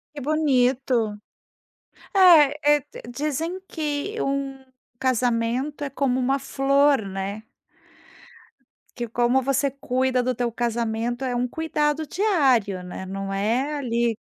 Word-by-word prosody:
Que 285 - -6
bonito. 255 -6 +1 1.0
Eh 335 -7 +7
eh, 295 -1 +3 0.2
dizem 305 +8 -3
que 310 +7 -3
um 275 -1 -3 0.3
casamento 250 +3 0
é 280 - -4
como 270 -2 0
uma 265 +2 +1
flor, 275 -1 +2
né. 195 +2 -5 1.5
Que 240 -1 -4
como 240 +3 +2
você 275 +1 +1
cuida 260 -2 0
do 255 +1 0
teu 240 0 -1
casamento, 235 +1 -2
é 250 -2 -1
um 245 +1 0
cuidado 305 +1 -1
diário, 270 - +1
né, 180 +1 -7
não 195 +1 -5
é 235 +9 0
ali 235 -4 0
que - - -52
260 Hz, 120 wpm, -24 LUFS, 235-290 Hz, 1.5 s, Eh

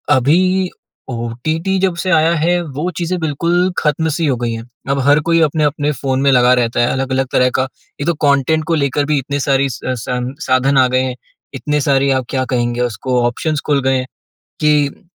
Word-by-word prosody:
अभी, 180 +8 +2 0.4
ओटीटी 130 +10 -2
जब 185 -2 +1
से 185 +2 -3
आया 165 0 +4
है 175 +3 +1
वो 150 +2 -4
चीज़ें 180 +1 -1
बिल्कुल 170 +4 0
ख़त्म 160 +2 0
सी 165 +2 -1
हो 135 - +1
गई 120 -1 -2
हैं। 115 0 -6 0.3
अब 140 0 +1
हर 145 +1 +5
कोई 165 0 +4
अपने-अपने 150 -1 +1
फ़ोन 135 -2 -2
में 140 0 +4
लगा 125 0 +5
रहता 120 -2 0
है, 120 - +3
अलग-अलग 135 0 -1
तरह 125 0 +3
का, 130 - +1 0.3
एक 145 - -3
तो 170 - +3
कंटेंट 140 +3 +2
को 165 - +1
लेकर 145 -1 0
भी 150 0 +1
इतने 140 +2 -3
सारे 140 0 +1
स 125 - -7 0.2
संसाधन 130 +2 -1
आ 130 -1 +5
गए 130 +1 +1
हैं। 130 -1 -3 0.4
इतने 150 +2 -1
सारे 140 0 +2
आप 130 -1 0
क्या 130 -1 -1
कहेंगे 120 -1 -1
उसको 125 +2 -1
ऑप्शंस 150 +5 -2
खुल 145 -2 +1
गए 130 0 +2
हैं, 130 - -2 0.6
कि 150 +1 +1
140 Hz, 200 wpm, -16 LUFS, 130-160 Hz, 0.6 s, हर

